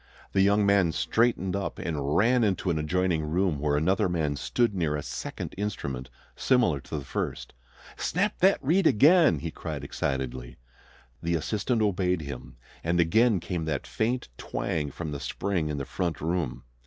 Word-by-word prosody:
The 95 Hz, -, +3 dB
young 100 Hz, +1 st, +4 dB
man 100 Hz, -4 st, +4 dB
straightened 95 Hz, +4 st, +1 dB
up 100 Hz, 0 st, -3 dB
and 75 Hz, -3 st, -2 dB
ran 120 Hz, +3 st, +4 dB
into 95 Hz, -3 st, +1 dB
an 80 Hz, -, 0 dB
adjoining 85 Hz, +1 st, 0 dB
room, 80 Hz, 0 st, 0 dB
where 75 Hz, 0 st, +1 dB
another 95 Hz, +6 st, +2 dB
man 80 Hz, -4 st, 0 dB
stood 105 Hz, -, 0 dB
near 80 Hz, -6 st, 0 dB
a 75 Hz, -, -3 dB
second -, -, -5 dB
instrument 70 Hz, -11 st, -4 dB, 0.3 s
similar 120 Hz, -, +2 dB
to 70 Hz, -, -6 dB
the 70 Hz, -, -6 dB
first. -, -, -4 dB, 0.4 s
"Snap 200 Hz, +4 st, 0 dB
that 190 Hz, +2 st, +5 dB
reed 165 Hz, +6 st, +3 dB
again!" 155 Hz, -, +5 dB
he 80 Hz, +3 st, -5 dB
cried -, -, -6 dB
excitedly. 65 Hz, -2 st, -3 dB, 0.6 s
The 85 Hz, 0 st, 0 dB
assistant 110 Hz, -, 0 dB
obeyed 90 Hz, -4 st, +1 dB
him, 65 Hz, -3 st, -8 dB, 0.3 s
and 85 Hz, +1 st, +1 dB
again 110 Hz, +5 st, +4 dB
came 85 Hz, -1 st, -3 dB
that 75 Hz, -3 st, -2 dB
faint 120 Hz, -, -1 dB
twang 75 Hz, -3 st, -2 dB
from 80 Hz, +2 st, -6 dB
the 70 Hz, -, -4 dB
spring 85 Hz, +2 st, -2 dB
in 75 Hz, -, -2 dB
the 70 Hz, -, -3 dB
front 85 Hz, -4 st, -2 dB
room. 80 Hz, -7 st, -2 dB
85 Hz, 165 wpm, -27 LUFS, 75-105 Hz, 0.6 s, that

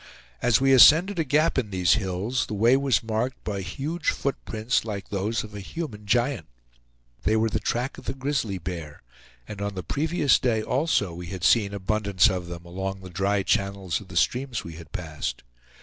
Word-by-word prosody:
As 120 Hz, -2 st, +4 dB
we 135 Hz, 0 st, +4 dB
ascended 160 Hz, -, +7 dB
a -, -, +3 dB
gap 150 Hz, +1 st, +2 dB
in 110 Hz, -5 st, -3 dB
these 90 Hz, -3 st, +3 dB
hills, 100 Hz, +4 st, -1 dB
the 105 Hz, -, -4 dB
way 115 Hz, +5 st, +4 dB
was 135 Hz, -6 st, +2 dB
marked 115 Hz, +3 st, -2 dB
by 100 Hz, -2 st, -3 dB
huge 145 Hz, -, -3 dB
foot 140 Hz, -, -1 dB
prints, 110 Hz, +3 st, 0 dB
like 100 Hz, -4 st, -6 dB
those 105 Hz, +3 st, -1 dB
of 110 Hz, -1 st, -10 dB
a 105 Hz, -, -6 dB
human 105 Hz, -, -6 dB
giant. 120 Hz, -, +1 dB, 0.7 s
They 110 Hz, -, +2 dB
were 110 Hz, +1 st, +2 dB
the -, -, 0 dB
track 125 Hz, +3 st, -2 dB
of -, -, -15 dB
the 135 Hz, -, -3 dB
grizzly 135 Hz, -7 st, -1 dB
bear; 85 Hz, -4 st, -7 dB, 0.4 s
and 105 Hz, -2 st, -7 dB
on 100 Hz, -1 st, -3 dB
the 95 Hz, -, -4 dB
previous 150 Hz, -, +2 dB
day 110 Hz, -4 st, +1 dB
also 125 Hz, -, 0 dB
we 85 Hz, +1 st, -7 dB
had 90 Hz, -1 st, -7 dB
seen 105 Hz, -2 st, +4 dB
abundance 100 Hz, -2 st, +2 dB
of 90 Hz, -2 st, -4 dB
them 85 Hz, 0 st, -8 dB
along 95 Hz, +2 st, -5 dB
the 95 Hz, -1 st, -10 dB
dry 95 Hz, +2 st, 0 dB
channels 100 Hz, -4 st, -1 dB
of 100 Hz, -, -13 dB
the 85 Hz, -, -6 dB
streams 125 Hz, +4 st, 0 dB
we 85 Hz, -, -8 dB
had 80 Hz, -2 st, -12 dB
passed. 80 Hz, -8 st, -5 dB
105 Hz, 195 wpm, -25 LUFS, 95-130 Hz, 0.7 s, ascended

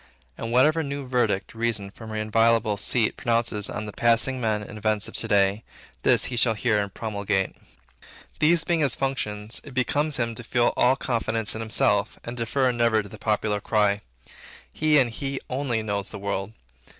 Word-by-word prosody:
And 115 Hz, -, -5 dB
whatsoever 150 Hz, +7 st, +4 dB
new 140 Hz, -2 st, -4 dB
verdict 120 Hz, -6 st, 0 dB
Reason 115 Hz, -4 st, -1 dB
from 110 Hz, +2 st, -11 dB
her 110 Hz, -, -5 dB
inviolable 110 Hz, 0 st, +2 dB
seat 110 Hz, +2 st, +2 dB
pronounces 115 Hz, -4 st, 0 dB
on 105 Hz, -, -4 dB
the 105 Hz, -, -7 dB
passing 120 Hz, +2 st, +2 dB
men 110 Hz, -2 st, 0 dB
and 105 Hz, -, -10 dB
events 105 Hz, -1 st, 0 dB
of -, -, -11 dB
to -, -, 0 dB
day, 100 Hz, +1 st, +2 dB, 0.4 s
this -, -, +3 dB
he 125 Hz, -, -4 dB
shall 115 Hz, -1 st, +3 dB
hear 105 Hz, -1 st, +1 dB
and 100 Hz, -1 st, -4 dB
promulgate. 100 Hz, -3 st, -2 dB, 0.8 s
These 165 Hz, +2 st, +4 dB
being 170 Hz, -2 st, +1 dB
his 140 Hz, -5 st, +2 dB
functions, 110 Hz, -5 st, -3 dB
it 140 Hz, -3 st, -12 dB
becomes 145 Hz, +4 st, 0 dB
him 115 Hz, -2 st, -1 dB
to 120 Hz, -, -9 dB
feel 120 Hz, +1 st, +1 dB
all 125 Hz, +2 st, +4 dB
confidence 115 Hz, -4 st, -1 dB
in 110 Hz, -, -5 dB
himself, 105 Hz, -2 st, +1 dB
and 120 Hz, -, -6 dB
to 115 Hz, -1 st, -3 dB
defer 130 Hz, +2 st, +1 dB
never 115 Hz, -2 st, +2 dB
to 100 Hz, -, -11 dB
the -, -, -11 dB
popular 105 Hz, -1 st, 0 dB
cry. 105 Hz, -1 st, +1 dB, 0.7 s
He 155 Hz, -1 st, +3 dB
and 125 Hz, -4 st, +3 dB
he 135 Hz, +3 st, -3 dB
only 125 Hz, -4 st, -1 dB
knows 100 Hz, -2 st, -2 dB
the 105 Hz, -, -6 dB
world. 100 Hz, +1 st, -3 dB
115 Hz, 185 wpm, -25 LUFS, 105-125 Hz, 0.8 s, whatsoever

